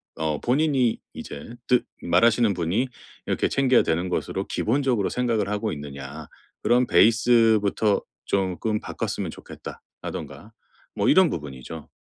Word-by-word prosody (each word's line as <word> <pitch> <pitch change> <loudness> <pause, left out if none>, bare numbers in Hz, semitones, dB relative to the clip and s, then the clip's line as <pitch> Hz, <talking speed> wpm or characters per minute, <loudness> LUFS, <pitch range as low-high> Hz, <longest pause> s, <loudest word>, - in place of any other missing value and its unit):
어. 80 -2 -1
본인이 130 -2 +2
이제 75 +12 -8
뜻 125 -1 +3 0.2
말하시는 115 +3 +3
분이 90 +8 0 0.4
이렇게 - - +1
"챙겨야 130 -2 +3
되는 85 +3 -1
것으로 - - -2
기본적으로 125 -3 0
생각을 115 -5 0
하고 105 +1 -1
있느냐. 70 -2 -7 0.4
그런 125 +1 +3
베이스부터 110 -3 +4 0.2
쪼끔 100 +3 -1
바꿨으면 - - -4
좋겠다."라든가 - - -9 0.4
뭐 - - 0
이런 185 -3 +6
부분이죠. 75 0 -7
110 Hz, 315 characters per minute, -24 LUFS, 85-120 Hz, 0.4 s, 이런